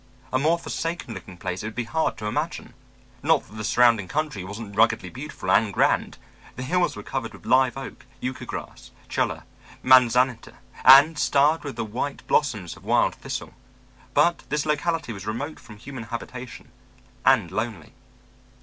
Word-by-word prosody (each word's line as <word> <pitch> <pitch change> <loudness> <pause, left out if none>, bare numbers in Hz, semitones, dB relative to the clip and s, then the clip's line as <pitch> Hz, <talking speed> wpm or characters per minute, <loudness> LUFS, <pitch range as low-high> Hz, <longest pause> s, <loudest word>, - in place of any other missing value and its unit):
A 130 - +3
more 160 +5 +3
forsaken 165 -6 -4
looking 95 -4 -10
place 90 +1 -4
it 110 - -4
would 110 - -7
be 120 - -1
hard 160 +7 -1
to 105 - -7
imagine. 105 - -3 0.5
Not - - +2
that 105 - -15
the 105 - -5
surrounding 115 -3 +4
country 150 -9 -2
wasn't 100 +2 -8
ruggedly 110 -4 +2
beautiful 130 - -5
and 105 +1 +4
grand; - - +1 0.4
the 125 - -5
hills 175 +6 +1
were 105 - -8
covered 130 -2 -4
with - - -14
live 130 0 +3
oak, 135 -2 -9
yucca 130 +1 -5
grass, - - -7 0.2
chulla, - - -1 0.4
manzanita, 125 -1 +4 0.3
and 145 +4 +8
starred 145 +3 +3
with 145 -5 -6
the 115 -1 -3
white 125 +6 -4
blossoms 110 - 0
of - - -17
wild - - +2
thistle. - - -6 0.6
But 170 0 +4
this 150 0 0
locality 150 -3 -1
was 95 -1 -9
remote 135 +9 -4
from 110 -3 -13
human 130 0 -8
habitation, 125 +2 -8 0.5
and 85 - +4
lonely. 105 -4 -4
125 Hz, 165 wpm, -24 LUFS, 110-145 Hz, 0.6 s, and